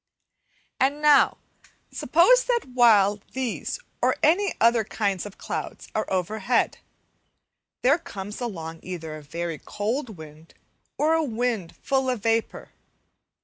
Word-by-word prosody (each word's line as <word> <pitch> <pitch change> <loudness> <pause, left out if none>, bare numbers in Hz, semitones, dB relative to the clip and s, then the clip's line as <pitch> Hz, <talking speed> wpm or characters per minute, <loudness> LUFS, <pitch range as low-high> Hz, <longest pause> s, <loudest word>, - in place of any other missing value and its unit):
Week - - -40 0.2
11 270 +2 +3
And 300 - -12
now, 295 -2 +5 0.5
suppose - - +4
that 480 -1 0
while 210 -5 +5
these 260 - -3 0.2
or - - +3
any 380 +5 +3
other 230 0 +4
kind 200 -3 -2
of 205 - -13
clouds - - -6
are 215 - -2
overhead, 210 +5 0 1.0
there 280 +6 +4
comes 205 - -8
along 165 -8 -5
either 165 -4 -6
a 155 - -9
very 165 +2 -5
cold 220 +1 -3
wind, 155 +1 -13 0.4
or 310 +2 +2
a 325 0 +2
wind 230 - -2
full 265 -1 0
of 245 -5 -2
vapour. 225 0 -1
225 Hz, 135 wpm, -25 LUFS, 185-265 Hz, 1.0 s, now